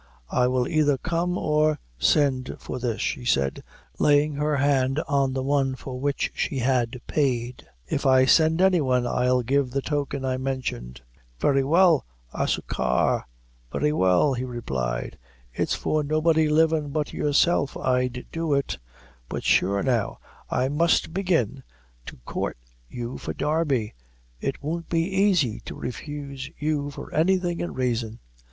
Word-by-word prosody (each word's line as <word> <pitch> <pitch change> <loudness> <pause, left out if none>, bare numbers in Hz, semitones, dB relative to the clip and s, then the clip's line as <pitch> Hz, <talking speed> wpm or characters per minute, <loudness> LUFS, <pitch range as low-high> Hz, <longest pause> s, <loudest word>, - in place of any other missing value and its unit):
"I 125 - +3
will 125 -1 +1
either 150 -4 +2
come 175 +3 -1
or 150 0 +2 0.2
send 130 - +2
for - - -6
this," 120 -3 -2
she - - -2
said 70 - +1 0.4
laying 145 +1 +4
her 150 +1 0
hand 140 -1 +2
on 140 -2 +1
the 130 0 -2
one 135 -1 +1
for 130 -1 -7
which 140 +1 -1
she 140 - -2
had 125 -1 0
paid. 125 -4 -1 0.2
"If 140 - -2
I 130 0 +6
send 160 +5 +4
any 185 -3 +4
one, 125 -3 +1
I'll 125 +1 +1
give 135 +2 +1
the 135 +2 -1
token 140 -2 -2
I 130 -1 0
mentioned." 125 - -4 0.4
"Very 135 - +3
well, 165 +1 +4 0.3
a - - -1
suchar - - 0 0.4
very 150 0 +1
well," 95 - +3
he 125 0 -3
replied; 65 - -4 0.3
"it's - - 0
for 155 -1 0
nobody 155 +1 +2
livin' 155 -1 +2
but 150 +1 -2
yourself 145 0 +2
I'd 125 -1 0
do 165 -3 0
it; 140 - -2 0.5
but - - -4
sure, 100 +2 +2
now 120 -6 0 0.3
that - - -2
I 130 - +2
must 160 +3 +2
begin 160 - 0 0.5
to - - -8
coort - - -3 0.3
you 120 +1 -6
for - - -5
Darby, 150 -8 0 0.5
it 135 - -4
won't 165 +3 -4
be 190 +4 +1
aisy 145 - +1
to - - -7
refuse 140 0 -6
you 150 -1 -1
for 140 - -9
anything 175 +1 +1
in 175 - -4
raison." 115 -3 -1
140 Hz, 150 wpm, -25 LUFS, 125-155 Hz, 0.5 s, I